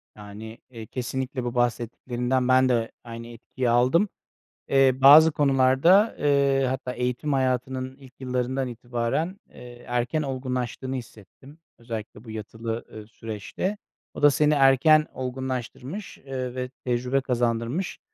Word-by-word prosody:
Yani, 105 +2 -10
eee, 115 -3 -9
kesinlikle 130 +2 -4
bu 120 0 -4
bahsettiklerinden 120 +1 -1
ben 130 0 +4
de 115 -2 0
aynı 115 0 -8
etkiyi 120 +2 -4
aldım. 125 - +3 0.6
Eee, 135 -1 +5
bazı 155 +4 +9
konularda, 140 - +4
eee, 140 -2 +2
hatta 130 -1 -3
eğitim 125 +4 -2
hayatının 130 0 -1
ilk 135 -2 -16
yıllarından 130 0 -2
itibaren, 120 - -3
eee, 120 0 -13
erken 125 +5 -1
olgunlaştığını 130 -1 -3
hissettim. 130 - -12 0.2
Özellikle 115 -2 -7
bu 115 - -10
yatılı, 110 +1 -5
eee, 110 -1 -9
süreçte. 110 - -5 0.4
O - - -7
da 145 - +8
seni 150 +1 +3
erken 145 +3 +5
olgunlaştırmış, 130 - -5
eee, 130 -2 -5
ve 125 0 -4
tecrübe 125 +2 0
kazandırmış. 120 +6 -1
130 Hz, 125 wpm, -25 LUFS, 120-135 Hz, 0.6 s, bazı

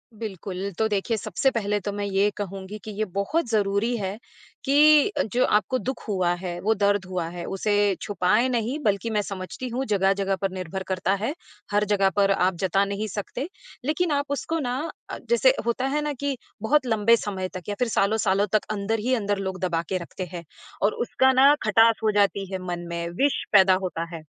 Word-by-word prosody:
बिल्कुल, 200 -2 -5
तो 220 - +3
देखिए 215 +2 -1
सबसे 270 +5 0
पहले 210 -3 -1
तो 205 +1 -4
मैं 205 0 -3
ये 200 +1 +2
कहूँगी 195 0 -6
कि 215 - -6
ये 215 - 0
बहुत 240 +9 0
ज़रूरी 210 +2 +1
है, 195 0 -3 0.5
कि 300 +5 +6 0.2
जो 250 - +3
आपको 215 +5 +2
दुःख 260 0 -4
हुआ 185 -4 +1
है, 175 -1 -5
वो 220 +3 +2
दर्द 200 -1 +1
हुआ 180 -3 -3
है 175 0 -7
उसे 205 +2 -1 0.3
छुपाएँ 205 +5 +2
नहीं, 240 +3 -1
बल्कि 205 +2 +1
मैं 210 -1 +1
समझती 195 +5 -6
हूँ, 260 +3 -2
जगह-जगह 195 -1 +1
पर 195 -1 0
निर्भर 185 0 -5
करता 190 0 0
है। 280 - 0 0.4
हर 205 +1 +3
जगह 195 -1 +3
पर 200 -1 +3
आप 185 -1 +2
जता 195 +1 +2
नहीं 200 +2 -3
सकते 215 - -4 0.4
लेकिन 315 +2 0
आप 285 0 +1
उसको 325 +3 -2
ना 250 -2 -2 0.3
अ, - - -5
जैसे - - +5
होता 235 +2 0
है 290 +3 0
ना, 295 0 -2
कि 280 0 -3 0.2
बहुत 270 +4 +2
लंबे 225 0 +4
समय 190 -4 -3
तक 185 -2 -6
या 205 - -2
फिर 250 - +2
सालों-सालों 205 -1 +2
तक 215 - +2
अंदर 215 +2 -1
ही 250 +4 0
अंदर 205 -3 -1
लोग 190 -1 -4
दबा 170 -3 0
के 190 - 0
रखते 180 +2 -6
हैं, 170 -1 -6 0.4
और 205 +2 +3
उसका 260 +2 +2
ना 275 +3 +7
खटास 225 +1 +4
हो 215 - +3
जाती 200 -1 +2
है 190 - -3
मन 175 -1 -4
में, 170 0 -3
विष 285 -1 +2
पैदा 190 -2 +7
होता 170 -2 -2
है। 160 - -8
205 Hz, 200 wpm, -25 LUFS, 190-235 Hz, 0.5 s, ना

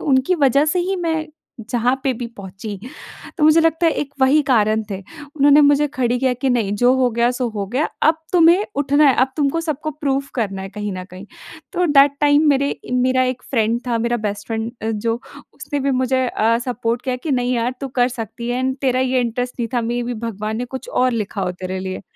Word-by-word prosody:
उनकी 270 +5 +2
वजह 275 +3 +3
से 360 - +1
ही 385 0 -1
मैं 325 -3 -1 0.4
जहाँ 245 0 +2
पे 270 - +2
भी 240 +1 -5
पहुँची 195 +1 -8 0.6
तो 300 - +3
मुझे 310 +2 +6
लगता 325 +1 +2
है 325 - +3
एक 285 -1 -4
वही 275 +3 +4
कारण 220 -3 +3
थे। 195 - -3 0.4
उन्होंने 285 +1 +6
मुझे 290 0 +4
खड़ी 245 -1 0
किया 260 0 +1
कि, 255 +2 -1
नहीं 225 -5 0
जो 245 +4 +4
हो 255 -1 +2
गया, 235 +1 +2
सो 250 0 -2
हो 205 -3 -4
गया, 255 +9 0 0.2
अब 315 +1 +4 0.2
तुम्हें 355 +3 +5
उठना 285 +1 +3
है, 260 - +4
अब 260 +1 +2
तुमको 295 +2 +1
सबको 310 -1 -3
प्रूफ 275 -2 -2
करना 195 -6 -2
है 190 - -6
कहीं 210 0 -4
ना 185 -1 -6
कहीं। 185 +1 -12 0.5
तो 360 -1 +1
दैट 285 -2 +5
टाइम 290 0 +4
मेरे 280 0 0
मेरा 255 +1 +2
एक 255 -1 -3
फ्रेंड 230 -2 +1
था, 235 -2 0
मेरा 235 +1 0
बेस्ट 210 -2 -4
फ्रेंड 225 0 -2 0.3
जो 230 +1 0 0.4
उसने 290 -2 -4
भी 275 +1 0
मुझे 260 0 +1
अ, 230 0 +1
सपोर्ट 240 -1 -2
किया 255 -1 -2
कि, 275 +5 -5
"नहीं 250 -1 0
यार 240 +1 -1
तू 275 - -4
कर 245 - +4
सकती 235 -1 -6
है। 245 - -1
एंड 260 0 -1
तेरा 255 -1 +2
ये 260 0 +1
इंटरेस्ट 245 +1 -2
नहीं 230 - -1
था 240 - +2
मेबी 240 0 -2
भगवान 215 0 -4
ने 245 - -2
कुछ - - -10
और 255 0 +2
लिखा 210 -3 -3
हो 180 -1 -1
तेरे 185 +1 -3
लिए।" 185 +1 -5
250 Hz, 220 wpm, -20 LUFS, 230-280 Hz, 0.6 s, मुझे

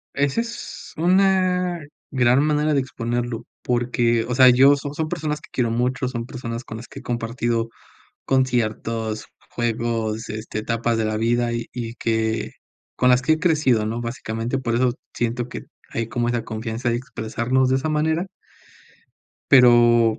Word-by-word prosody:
Ese 140 +10 +1
es 235 0 -8
una 180 -1 +2 0.3
gran 125 +1 +3
manera 150 0 +2
de 140 - +3
exponerlo 120 -2 -3 0.2
porque, 120 -1 +1
o 125 - -1
sea, 130 0 +8
yo, 135 +3 +6
son 140 0 -5
son 155 +1 -2
personas 150 -1 -3
que - - -15
quiero 120 -3 0
mucho, 125 +2 0
son 120 -2 -4
personas 120 -1 -6
con 110 - -7
las 115 +2 -9
que - - -11
he - - -10
compartido 115 -1 -2 0.5
conciertos, 115 -4 0 0.2
juegos, 115 -2 -2
este, 110 0 -4
etapas 115 +1 0
de 110 - 0
la 110 0 -1
vida, 120 +1 +1
y 115 0 -3
y 115 -2 -4
que 110 -1 -1 0.4
con 125 0 +4
las 125 - +5
que 140 +5 +2
he 155 - +2
crecido, 150 - +2
¿no? 115 +2 -2
Básicamente, 115 +1 -3
por 120 -3 -2
eso 125 0 +2 0.2
siento 120 +1 -2
que - - -7 0.3
hay 115 -1 -3
como 120 +1 -1
esa 120 -2 -1
confianza 115 +2 -3
de 120 - +1
expresarnos 125 +1 -1
de 130 - +3
esa 140 +4 -1
manera. 160 +3 +1 1.3
Pero 120 -3 +6
120 Hz, 165 wpm, -22 LUFS, 115-135 Hz, 1.3 s, sea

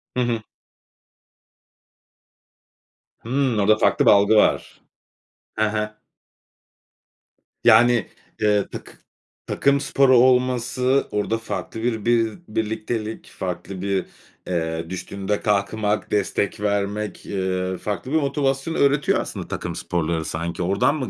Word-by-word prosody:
Hı 125 - +1
hı. 115 -2 -1 2.8
Hımm, 125 -2 0
orada 110 +2 +4
farklı - - +2
bir - - +8
algı 100 +2 +5
var. - - +2 0.8
He 110 0 +2
he. 105 0 -2 1.7
Yani, 120 +1 +5 0.3
eee, 105 -1 +2
takı - - -8 0.6
takım 140 0 +2
sporu 135 -2 +4
olması 125 +1 +2
orada 105 +2 0
farklı 115 0 -5
bir 115 -3 -1
bi 115 -2 +3 0.2
birliktelik, 110 0 -3
farklı 90 +1 -6
bir, 100 -1 -1 0.4
eee, 80 -2 -2
düştüğünde 100 +2 -3
kalkmak, 105 +1 0
destek 100 0 0
vermek, 105 +1 -2
ııı, 95 -1 -2
farklı 105 +5 -4
bir - - 0
motivasyon 140 +2 -1
öğretiyor, 140 0 +2
aslında, - - -5
takım - - -4
sporları 80 -2 -2
sanki. 85 +3 -3
Oradan 100 - +2
mı 130 -5 -3
105 Hz, 110 wpm, -22 LUFS, 100-120 Hz, 2.8 s, bir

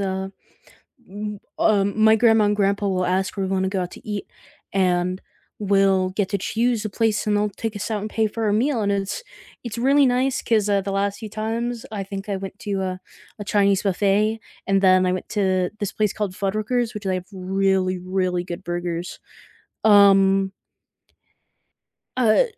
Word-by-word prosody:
uh, 190 -1 -2 1.3
um, 205 0 +2
my 220 0 +7
grandma 225 -1 +4
and 205 0 +2
grandpa 200 0 +1
will 185 -2 0
ask 185 +2 0
if - - -20
we 190 - -1
wanna 190 0 0
go 190 -1 -1
out 180 - -7
to 255 - -13
eat, 205 -2 -3 0.5
and 180 -1 +1 0.4
we'll 195 -2 +2
get 195 0 -1
to 200 - 0
choose 230 +3 0
a - - -1
place 215 0 0
and 210 - +2
they'll 210 0 +1
take 220 +2 -5
us 205 +2 -4
out 210 -2 -1
and 215 - -4
pay 220 0 +1
for 220 +1 -3
a 205 - +2
meal, 245 +2 +1
and 200 -1 +1
it's 200 - -2 0.4
it's 235 -2 -6
really 275 +4 +4
nice 255 +1 +1
'cause, 215 -3 +1
uh, 200 - +3
the 195 +1 -4
last 200 +1 -1
few 220 - -6
times, 225 +2 -3
I 205 -2 -3
think 195 +1 -7
I 200 - -1
went 195 +1 -8
to, 200 -2 -2
uh, 185 -1 -2 0.4
a - - -4
Chinese 200 -1 +2
buffet, 205 +3 +1 0.3
and 195 0 +2
then 185 -1 +5
I 180 - +2
went 185 - -4
to 185 -3 +1
this 205 -3 -2
place 210 -2 0
called 205 -3 -3
Fuddruckers, 215 +5 -1
which 210 -1 -7
they 190 -1 0
have 180 0 -5
really, 190 0 0
really 185 -1 -1
good 175 +1 -7
burgers. 175 0 -4 0.6
Um 195 -2 +5 1.6
uh, 235 - +4
200 Hz, 185 wpm, -22 LUFS, 190-215 Hz, 1.6 s, my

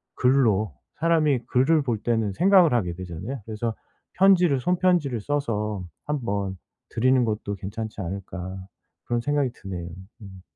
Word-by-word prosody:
글로 115 - +2 0.3
사람이 155 -5 +3
글을 145 +5 +3
볼 120 -5 -1
때는 110 -3 0
생각을 180 - +5
하게 95 -8 0
되잖아요. 95 +8 -6
그래서 110 +1 -3 0.4
'편지를, 180 -7 +4
손 180 +6 +1
편지를 165 - +2
써서 105 -7 -2 0.2
한번 100 -10 -2 0.3
드리는 130 +2 +3
것도 105 -2 -2
괜찮지 105 +2 -6
않을까.' 95 0 -6 0.5
그런 120 0 -1
생각이 145 +1 +1
드네요. 90 -6 -7 0.3
음. 95 -2 -11
115 Hz, 300 characters per minute, -25 LUFS, 100-145 Hz, 0.5 s, 생각을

